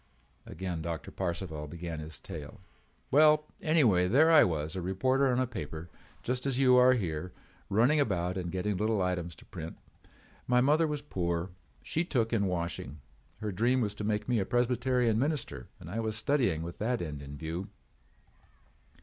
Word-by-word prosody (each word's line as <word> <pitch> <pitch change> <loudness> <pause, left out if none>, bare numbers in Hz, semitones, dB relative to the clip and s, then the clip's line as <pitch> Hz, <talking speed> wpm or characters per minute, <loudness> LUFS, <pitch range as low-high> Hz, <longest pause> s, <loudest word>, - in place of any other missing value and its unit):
Again 90 -2 -4
Doctor 85 0 -5
Parcival 80 -4 -4
began 85 0 -6
his 75 -2 -7
tale: 80 +2 -8 0.5
"Well, 150 +1 +6 0.2
anyway 120 - +4
there 150 - +5
I 160 - +8
was, 80 -1 -1
a 95 - -2
reporter 130 +10 +1
on 125 -1 +2
a 130 - +2
paper 85 - -7 0.3
just 125 +2 -1
as 135 -2 0
you 130 -2 +5
are 125 +1 +7
here, 90 -6 -3 0.4
running 120 +9 +4
about 90 -8 0
and 90 -2 -3
getting 95 +1 -1
little 110 +1 +1
items 90 -2 -2
to - - -17
print. 80 +1 -8 0.7
My 125 0 +4
mother 150 +5 +4
was 150 -1 -3
poor. 85 - -2 0.3
She 165 - 0
took 120 -9 0
in 100 -3 +2
washing. 85 -4 -3 0.4
Her 105 -1 -2
dream 120 +7 +2
was 105 -4 0
to 105 - -6
make 105 0 -1
me 120 -3 +2
a - - +1
Presbyterian 120 -1 +2
minister 140 - -2
and - - -11
I 100 +7 -3
was 110 -1 -1
studying 110 - +1
with 85 +1 -7
that 120 +3 0
end 75 -4 -5
in 70 0 -8
view. 80 +5 -4
105 Hz, 175 wpm, -30 LUFS, 85-125 Hz, 0.7 s, I